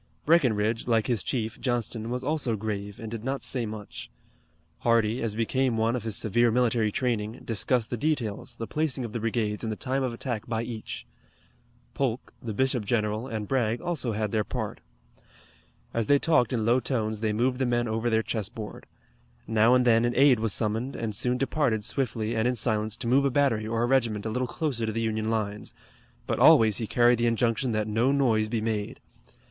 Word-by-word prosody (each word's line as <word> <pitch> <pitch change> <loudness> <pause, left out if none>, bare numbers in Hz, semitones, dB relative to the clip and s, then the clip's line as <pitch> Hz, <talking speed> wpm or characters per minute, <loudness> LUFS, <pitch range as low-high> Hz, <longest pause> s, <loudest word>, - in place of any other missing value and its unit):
Breckinridge, 115 -9 +2
like 115 -2 +2
his 120 -6 0
chief, 115 -3 -3
Johnston, 120 -2 -2
was 125 +1 -3
also 140 -5 -1
grave 105 -1 -4
and 110 -1 -7
did 115 -2 -5
not 135 +2 -3
say 120 -4 -2
much. 105 -1 -8 0.7
Hardee, 115 0 +2
as 110 -3 -2
became 120 +2 0
one 115 +2 +1
of 125 - -2
his 110 -1 -3
severe 120 +4 +2
military 115 -2 +2
training, 115 -2 -2
discussed 115 +1 +1
the 120 - -1
details, 125 -4 -2
the 115 - -5
placing 145 -2 -1
of 110 - -7
the 120 - -2
brigades 110 -1 -1
and 110 - -2
the - - -2
time 135 +1 -1
of 130 -2 -1
attack 115 -2 -4
by 115 -1 -1
each. 115 -2 -6 0.9
Polk, 130 -3 -2
the 115 - -4
bishop 130 -2 +1
general, 110 +2 -1
and 110 -4 -4
Bragg, 120 -2 0
also 160 -10 -1
had 105 -1 -2
their 110 -1 +1
part. - - -4 1.1
As 115 -2 -1
they 145 - +5
talked 140 -6 +2
in 115 -4 0
low 120 +3 +4
tones 110 -4 -2
they 110 -1 0
moved 125 +4 0
the 130 - +1
men 120 -1 +1
over 110 +2 -1
their 110 -1 +2
chessboard. 110 -1 -5 0.6
Now 115 +2 +4
and 125 -1 +3
then 115 -1 +5
an 120 0 +1
aide 135 -3 +5
was 110 -1 0
summoned, 115 +6 -1
and 115 -2 -3
soon 125 +4 0
departed 125 -6 0
swiftly 115 -4 -1
and 110 +1 +1
in 125 - +1
silence 110 -2 -1
to 120 - -4
move 135 +4 +4
a 140 - +3
battery 125 -5 +1
or 115 +1 0
a - - +3
regiment 120 -5 +1
a 110 - -2
little 125 +3 -1
closer 125 -6 -2
to - - 0
the 115 +1 -2
Union 110 -1 -1
lines, 105 -2 -3 0.5
but - - -2
always 110 -3 +6
he 110 - -3
carried 120 +1 +4
the 120 - +2
injunction 115 +2 +1
that 110 0 0
no 115 +5 +2
noise 115 -6 +2
be 115 -1 -1
made. 110 -2 -3
115 Hz, 200 wpm, -27 LUFS, 110-125 Hz, 1.1 s, always